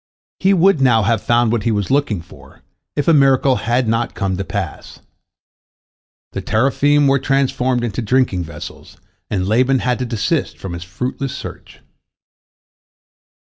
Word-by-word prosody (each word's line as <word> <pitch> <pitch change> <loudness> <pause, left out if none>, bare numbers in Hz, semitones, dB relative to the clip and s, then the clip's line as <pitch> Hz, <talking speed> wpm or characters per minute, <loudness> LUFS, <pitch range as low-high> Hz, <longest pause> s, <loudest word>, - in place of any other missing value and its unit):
He 195 - +3
would 185 -3 +3
now 120 -5 +4
have 110 +1 +1
found 120 -1 +2
what 120 -2 0
he 115 - 0
was 100 -3 -1
looking 130 - 0
for, - - -17 0.3
if 145 - -1
a 165 - +6
miracle 135 -2 +4
had 120 +1 0
not 115 +1 -1
come 95 -3 -1
to 95 - -3
pass. 85 - -6 1.3
The - - -4
teraphim 140 +5 +2
were 135 0 +3
transformed 130 -2 0
into 120 +1 -2
drinking 115 -5 +1
vessels, 75 -2 -10 0.3
and 95 -3 -1
Laban 130 +5 +3
had 125 0 -1
to 125 - -2
desist 115 -3 -1
from 95 -3 -7
his 85 0 -6
fruitless 125 +9 -4
search. - - -10
120 Hz, 150 wpm, -18 LUFS, 105-135 Hz, 1.3 s, a